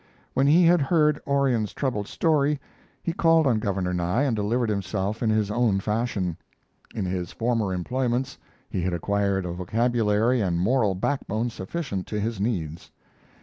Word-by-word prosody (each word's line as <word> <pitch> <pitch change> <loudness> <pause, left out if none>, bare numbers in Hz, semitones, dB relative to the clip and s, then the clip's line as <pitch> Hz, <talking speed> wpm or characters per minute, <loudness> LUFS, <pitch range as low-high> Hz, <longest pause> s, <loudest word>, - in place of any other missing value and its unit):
When 135 +1 +2
he 170 +4 +6
had 170 -1 +5
heard 150 0 +2
Orion's 135 -6 +1
troubled 115 -7 -2
story, 150 -3 +1 0.4
he 170 - -1
called 165 -3 +4
on 120 -5 +2
Governor 95 -4 -1
Nye 90 +9 0
and 130 -5 +1
delivered 110 +3 0
himself 100 +1 -2
in 115 - +1
his 110 -1 +1
own 110 -3 +2
fashion. 105 -5 -1 0.6
In 105 - -2
his 90 -1 -3
former 115 -4 0
employments 125 +7 -2 0.3
he 90 - -3
had 90 +1 -1
acquired 100 +1 0
a 90 - -3
vocabulary 115 +4 +1
and 90 -4 0
moral 105 +1 +2
backbone 115 +1 -1
sufficient 100 - -4
to 105 - -3
his 110 0 -2
needs. 85 -8 -3
110 Hz, 155 wpm, -25 LUFS, 95-130 Hz, 0.6 s, he